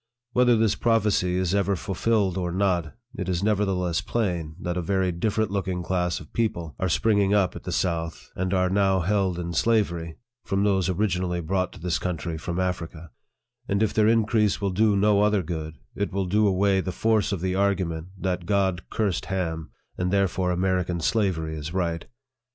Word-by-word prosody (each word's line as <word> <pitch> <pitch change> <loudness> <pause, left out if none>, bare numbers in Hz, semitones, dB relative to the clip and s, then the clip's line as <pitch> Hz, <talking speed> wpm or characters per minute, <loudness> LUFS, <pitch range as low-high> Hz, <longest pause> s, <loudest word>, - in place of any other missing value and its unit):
Whether 125 -1 +4
this 110 -2 +3
prophecy 105 -6 +1
is 90 0 0
ever 100 0 +2
fulfilled 95 +1 0
or 90 -2 -2
not, 90 -3 0 0.2
it 95 -2 -4
is 90 0 -1
nevertheless 95 -4 +1
plain 90 -8 -2
that 90 0 -3
a 90 - -1
very 95 +1 0
different 105 +3 -1
looking 95 -3 -2
class 90 -1 -1
of 80 - -14
people 85 -9 -1
are 95 - 0
springing 100 +2 +2
up 95 -3 +2
at - - -9
the - - -3
south, 85 -2 -2
and 95 0 -2
are 95 -1 +2
now 95 -1 +3
held 95 0 +1
in 85 -1 -4
slavery, 85 -5 0 0.3
from 95 +1 0
those 95 -3 +2
origin 95 -1 0
ally 90 -1 -1
brought 90 +3 -1
to - - -12
this 85 0 -1
country 85 -2 -3
from 85 +3 -4
Africa; 85 -3 -3 0.6
and 100 +2 +1
if 110 - 0
their 110 -1 +3
increase 110 -2 +2
will 100 -1 -1
do 105 +2 +3
no 105 0 +4
other 105 -2 +2
good, 80 -2 -5 0.2
it 100 - -2
will 95 0 -1
do 105 +4 +2
away 95 0 +2
the 95 - -3
force 110 +3 +1
of 100 - -1
the 95 0 0
argument, 95 -4 0
that 90 -2 -2
God 95 -3 +1
cursed 100 -5 -1
Ham, 80 -5 -3 0.3
and 90 0 0
therefore 95 -2 +1
American 90 -1 0
slavery 80 -4 0
is 80 +3 -6
right. 85 -3 -1
95 Hz, 185 wpm, -25 LUFS, 85-100 Hz, 0.6 s, Whether